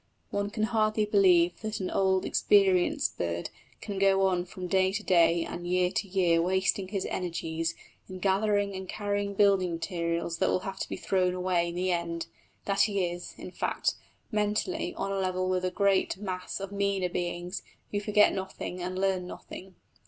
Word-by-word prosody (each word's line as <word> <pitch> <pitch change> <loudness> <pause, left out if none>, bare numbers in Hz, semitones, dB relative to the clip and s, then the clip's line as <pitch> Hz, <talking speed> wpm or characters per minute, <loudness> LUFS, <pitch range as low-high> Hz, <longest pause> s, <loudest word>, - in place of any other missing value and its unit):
One 200 0 -1
can 215 +1 -2
hardly 215 -1 +2
believe 180 -4 +4
that 215 -1 -3
an 185 - -3
old, 190 -1 +2
experienced 200 - +3
bird - - -2 0.3
can 200 -3 -4
go 195 0 +4
on 180 -2 +1
from 185 0 -7
day 190 +1 +2
to 210 +2 -3
day 170 -2 +4
and 175 0 -6
year 180 0 +2
to 200 - -2
year 180 -3 +3
wasting 190 +2 +1
his 195 -1 -3
energies 165 -2 -2 0.3
in 185 - -6
gathering 200 +1 +1
and 190 -1 -7
carrying 205 -1 -2
building 195 -3 +3
materials 170 0 -2
that - - +2
will 185 - +1
have 195 0 -6
to - - -3
be - - -3
thrown 185 -1 +1
away 180 -2 +1
in 170 - -6
the 185 +1 0
end 170 -1 -2 0.4
that 200 0 +2
he 200 -3 +2
is, 175 0 -6
in - - -8
fact, - - -1 0.4
mentally 210 - -1
on 195 - -3
a 195 - -1
level 185 -1 0
with 185 0 +1
the 185 - 0
great 195 0 +2
mass 185 -2 -4
of 195 0 -6
meaner 200 -2 0
beings 175 +1 -3 0.3
who 205 - 0
forget 210 0 +4
nothing 190 -1 -5
and 185 +1 -3
learn 190 -2 0
nothing. 185 +1 -10
190 Hz, 180 wpm, -29 LUFS, 180-200 Hz, 0.4 s, believe